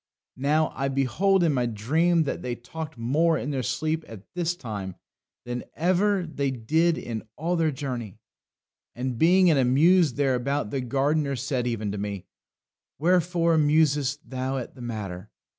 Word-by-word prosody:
"Now, 155 +3 +2
I 135 - -1
beheld 140 - +2
in 160 -3 +3
my 125 -2 +1
dream 160 +10 +2
that 145 - -3
they 125 -1 -3
talked 155 +5 -8
more 155 +8 +2
in 145 +1 -3
their 135 -2 -1
sleep 155 +6 -1
at 105 -4 -10
this 175 -1 -1
time 105 - -6 0.5
than 120 0 -4
ever 185 +3 +2
they 140 -4 -2
did 155 +7 +1
in 115 -2 -4
all 170 +3 -1
their 165 -2 +2
journey. 130 -7 -5 0.8
And 125 -1 -3
being 180 +2 +5
in 150 -4 +4
a - - +4
muse 155 +4 +4
thereabout, 135 -2 0
the 135 - -1
gardener 140 +3 0
said 130 -1 -2
even 110 -4 -2
to 100 - -4
me: 100 -2 -4 0.7
Wherefore 170 0 +2
musest 145 -1 +2
thou 130 +1 -3
at 125 - -6
the 130 - -13
matter? 105 -6 -6
140 Hz, 160 wpm, -26 LUFS, 120-160 Hz, 0.8 s, being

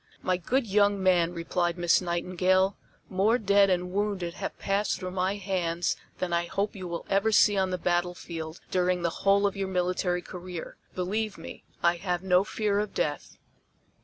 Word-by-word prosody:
"My 185 - +2
good 245 +9 0
young 205 -1 +2
man," 175 -2 +3
replied 175 0 -1
Miss 175 0 +3
Nightingale, 185 +2 +1 0.3
"more 200 +5 +2
dead 200 -2 +4
and 180 -1 0
wounded 195 -3 -1
have - - -5
passed 200 +1 0
through 185 -1 -5
my 185 +1 0
hands 180 -4 -1 0.2
than 180 -2 -2
I 170 0 +1
hope 200 +4 -2
you 185 -2 -6
will 170 -1 -5
ever 200 +3 +2
see 205 0 +5
on 190 -1 +1
the 185 - -1
battlefield 175 -2 -2
during 180 -1 +1
the 170 - +1
whole 200 +1 +4
of 200 - 0
your 195 -1 -2
military 180 -1 0
career; 180 -2 -7 0.2
believe 205 +3 -2
me, 165 - -10 0.2
I 170 0 +3
have 180 0 -2
no 185 0 +4
fear 205 -1 0
of 210 0 -3
death." 145 -1 -2
185 Hz, 175 wpm, -28 LUFS, 175-200 Hz, 0.3 s, see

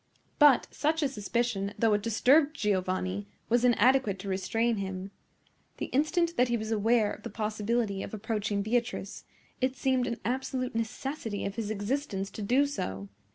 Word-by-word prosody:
But 290 -4 +7
such 315 +1 0
a - - +3
suspicion, 215 -4 -2
though 225 -2 +3
it 205 - +2
disturbed 275 +8 +3
Giovanni, 185 - -1 0.2
was 240 +1 +3
inadequate 245 -3 +4
to 200 - -8
restrain 225 +5 0
him. 190 0 -4 0.7
The - - -5
instant 335 +5 +1
that 250 - +4
he 240 0 +1
was 220 0 -4
aware 220 0 +3
of - - -10
the - - -6
possibility 215 -1 -1
of - - -6
approaching 210 -1 -2
Beatrice, 235 -2 -2 0.4
it 255 +1 +1
seemed 260 -1 +1
an 235 -1 -3
absolute 255 0 -2
necessity 230 0 -3
of 200 - -3
his 210 0 -4
existence 205 -1 -2
to - - -7
do 250 +7 +3
so. 100 - -4
225 Hz, 160 wpm, -29 LUFS, 200-255 Hz, 0.7 s, But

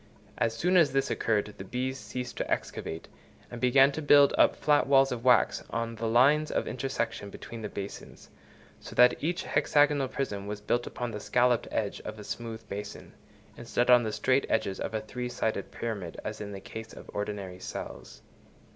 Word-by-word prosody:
As 115 -1 +1
soon 180 +10 +2
as 165 -6 +4
this 135 0 +1
occurred, 105 -2 0
the - - -5
bees 130 +6 -3
ceased 125 -1 -6
to - - -3
excavate, 80 0 -3 0.4
and 120 -1 -7
began 135 +2 +5
to 155 - -4
build 145 -1 +6
up - - +4
flat 150 -2 +2
walls 135 -1 +5
of 120 -2 -4
wax 125 -3 +4
on 115 0 -2
the 115 0 -3
lines 140 +7 +4
of - - -1
intersection 120 -5 -3
between 115 +3 -9
the 105 - -4
basins, 100 0 -8 0.5
so - - -10
that 125 +3 +5
each 175 +3 -1
hexagonal 145 -2 +2
prism 105 -7 -4
was 105 0 -4
built 120 +3 -1
upon 120 -1 -4
the 105 - -5
scalloped 120 +1 +2
edge 105 -2 -2
of 110 - -7
a 105 - -9
smooth 115 0 -6
basin, 100 0 -7 0.4
instead 120 +1 0
of - - +10
on 120 - +7
the 110 -2 -2
straight 130 +5 +1
edges 100 -3 0
of - - -3
a 110 - -1
three 125 +3 -5
sided 110 -4 -2
pyramid 100 -8 -5
as 110 0 -5
in 100 -1 -6
the 100 -1 -7
case 110 0 -8
of - - -12
ordinary 105 -3 -4
cells. - - -8
115 Hz, 190 wpm, -29 LUFS, 105-130 Hz, 0.5 s, of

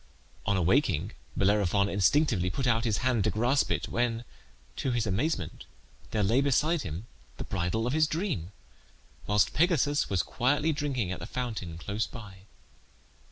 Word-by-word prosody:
On 100 - +2
awaking 95 - +2 0.3
Bellerophon 100 0 +3
instinctively 100 - +2
put 130 +9 -2
out 115 -1 +2
his 110 -3 +1
hand 120 -5 +2
to - - +3
grasp 125 +6 +1
it, - - -1
when, 120 -1 -1 0.5
to - - -1
his 120 -2 0
amazement, 100 - -2 0.4
there 105 -2 0
lay 115 +8 +3
beside 145 +4 +2
him 85 +4 -5 0.3
the - - -4
bridle 95 +4 -1
of 125 - -1
his 155 0 +3
dream, 155 - -2 0.8
whilst 105 0 +3
Pegasus 150 -3 +2
was 95 -4 +1
quietly 145 +5 +1
drinking 135 -10 -2
at 95 - -4
the - - -7
fountain 110 -10 -4
close 100 +6 -2
by. 100 -5 -11
115 Hz, 155 wpm, -29 LUFS, 95-140 Hz, 0.8 s, Bellerophon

